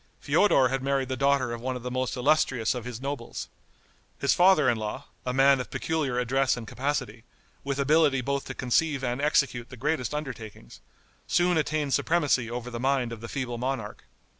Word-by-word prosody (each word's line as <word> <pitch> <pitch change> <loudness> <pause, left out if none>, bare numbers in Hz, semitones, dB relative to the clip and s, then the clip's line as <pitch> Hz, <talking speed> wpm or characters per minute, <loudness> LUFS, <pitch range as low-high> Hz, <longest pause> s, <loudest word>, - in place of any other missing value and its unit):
Feodor 135 -11 +3
had 135 +1 -1
married 135 -1 0
the 130 - -1
daughter 135 -2 +1
of 120 - -6
one 130 +1 -2
of 125 - -7
the 125 - -4
most 130 0 -1
illustrious 125 -4 +2
of 125 -2 -6
his 125 -2 -6
nobles. 135 -3 -5 0.7
His 140 - +2
father 180 -3 +5
in 120 - +3
law, 110 +6 -5 0.2
a - - +1
man 135 +1 +4
of 125 - -5
peculiar 155 -6 -2
address 130 +2 +1
and 120 - -6
capacity, 125 -5 -3 0.4
with 140 0 -2
ability 145 -1 +3
both 140 +2 -2
to - - -6
conceive 135 +2 +1
and 125 +2 -1
execute 135 -5 +1
the 125 - -10
greatest 150 +2 -1
undertakings, 115 - -7 0.5
soon 175 0 +2
attained 150 -2 0
supremacy 145 -7 +1
over 120 +1 -5
the 120 - -5
mind 130 -2 +1
of 110 - -9
the 115 - -7
feeble 125 -3 -4
monarch. 125 -4 -4
130 Hz, 190 wpm, -27 LUFS, 120-140 Hz, 0.7 s, father